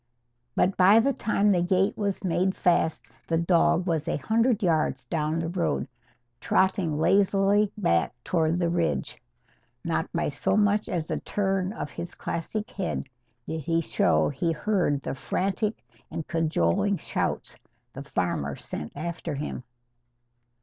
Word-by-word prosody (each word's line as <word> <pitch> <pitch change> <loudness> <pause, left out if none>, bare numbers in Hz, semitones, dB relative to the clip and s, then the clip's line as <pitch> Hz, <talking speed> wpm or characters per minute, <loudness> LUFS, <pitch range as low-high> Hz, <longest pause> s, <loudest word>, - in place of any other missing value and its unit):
But 190 +2 +2
by 195 +4 +7
the 275 +4 +2
time 210 -2 +1
the 180 -3 +3
gate 190 +3 +2
was 200 -2 -2
made 185 +1 +1
fast 170 -2 +1 0.2
the 165 - +1
dog 170 +1 +3
was 160 -4 -1
a - - 0
hundred 225 - +1
yards 155 -6 +1
down 155 +3 -1
the 165 0 -1
road, 175 0 -1 0.5
trotting 190 -5 +1
lazily 195 +4 +3
back 115 - +1
toward 165 -1 +1
the 175 -1 +1
ridge. 170 -1 -1 0.6
Not - - -1
by - - 0
so - - 0
much 205 +1 +2
as 170 -6 -2
a - - -1
turn 195 -2 -1
of 210 -9 -5
his 170 - -7
classic 210 +7 -4
head 195 -7 -3 0.4
did 160 - -3
he 165 +3 +1
show 165 - +2
he 150 +4 -1
heard 165 -4 0
the - - -3
frantic 195 - -2 0.2
and 160 - -5
cajoling 165 - +1
shouts - - -3 0.4
the 135 - -7
farmer 85 - -2
sent 75 - -7
after 165 0 -4
him. 140 -2 -5
175 Hz, 145 wpm, -26 LUFS, 160-195 Hz, 0.6 s, by